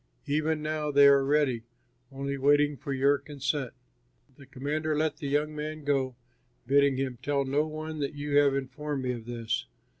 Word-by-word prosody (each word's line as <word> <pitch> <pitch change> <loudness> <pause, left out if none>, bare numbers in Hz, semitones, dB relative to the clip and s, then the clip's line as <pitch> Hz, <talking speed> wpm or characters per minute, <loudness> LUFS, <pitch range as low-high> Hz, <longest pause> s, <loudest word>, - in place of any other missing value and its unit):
Even 155 +1 0
now 155 -1 -2
they 140 0 +6
are 140 -1 +6
ready, 140 -4 +2 0.5
only 140 +1 -3
waiting 145 +2 +3
for 140 +2 -7
your 140 +1 +3
consent." 140 -2 -3 0.6
The 140 -1 -15
commander 150 +3 -2
let 155 -1 0
the 145 - -5
young 150 +2 0
man 155 0 -5
go, 135 -3 0 0.5
bidding 140 +1 +3
him, 130 -3 -3
"Tell 140 -1 0
no 145 +3 +1
one 155 0 -6
that 140 0 -3
you 145 0 -3
have 140 -1 +5
informed 140 +1 -3
me 125 - 0
of 120 -2 -7
this." 115 - -3
140 Hz, 175 wpm, -28 LUFS, 135-150 Hz, 0.6 s, they